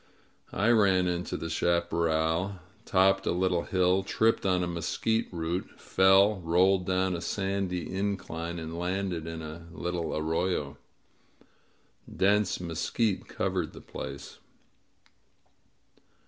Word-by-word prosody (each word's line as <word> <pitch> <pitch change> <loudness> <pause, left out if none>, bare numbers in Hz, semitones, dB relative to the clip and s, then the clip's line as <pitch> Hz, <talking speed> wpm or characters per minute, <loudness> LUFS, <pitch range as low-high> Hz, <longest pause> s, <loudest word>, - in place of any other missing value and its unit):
•.. - - -34 0.5
I 105 +5 +2
ran 95 -5 +4
into 90 0 -2
the 80 - -5
chaparral, 85 +2 0 0.3
topped 95 +1 +3
a - - +3
little 90 -1 +1
hill, 95 0 +2
tripped 110 +2 +1
on 90 -1 +2
a - - -1
mesquite 85 +6 -1
root, 85 +1 -4
fell, 95 +2 +4
rolled 90 +2 +3
down 95 0 +1
a 85 - -4
sandy 95 -3 -2
incline, 95 -4 -3
and 80 0 -6
landed 90 -2 -2
in 80 -1 -6
a 80 +2 -8
little 85 -2 -3
arroyo. 80 -2 -1 1.4
Dense 100 +1 +2
mesquite 90 +5 -1
covered - - -2
the - - -10
place. 70 0 -8
90 Hz, 120 wpm, -29 LUFS, 85-95 Hz, 1.4 s, ran